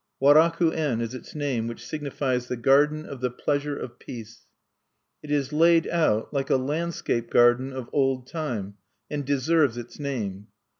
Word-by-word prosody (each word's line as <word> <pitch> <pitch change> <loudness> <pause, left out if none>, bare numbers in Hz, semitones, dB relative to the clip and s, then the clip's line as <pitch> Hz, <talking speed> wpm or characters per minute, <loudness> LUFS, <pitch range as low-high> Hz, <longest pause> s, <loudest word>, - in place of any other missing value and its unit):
Waraku 160 +4 +5
en 145 -8 0
is 115 +1 -3
its 130 - -10
name, 135 -6 -1
which 115 - -7
signifies, 135 -4 -2
"The 125 - -3
Garden 145 +5 +3
of 140 -3 -8
the 125 - +1
Pleasure 145 +3 -2
of 120 -1 -8
Peace." 115 -2 -10 0.7
It 150 - -11
is 145 -1 0
laid 165 +1 +4
out 155 -11 +1
like 135 -1 -1
a - - +4
landscape 135 -4 -2
garden 120 +2 +4
of 130 -2 -6
old 135 -3 +1
time, 120 - -4 0.3
and 145 -1 -2
deserves 140 -1 +2
its 120 +3 -9
name. 105 -8 -4
135 Hz, 160 wpm, -25 LUFS, 120-150 Hz, 0.7 s, Waraku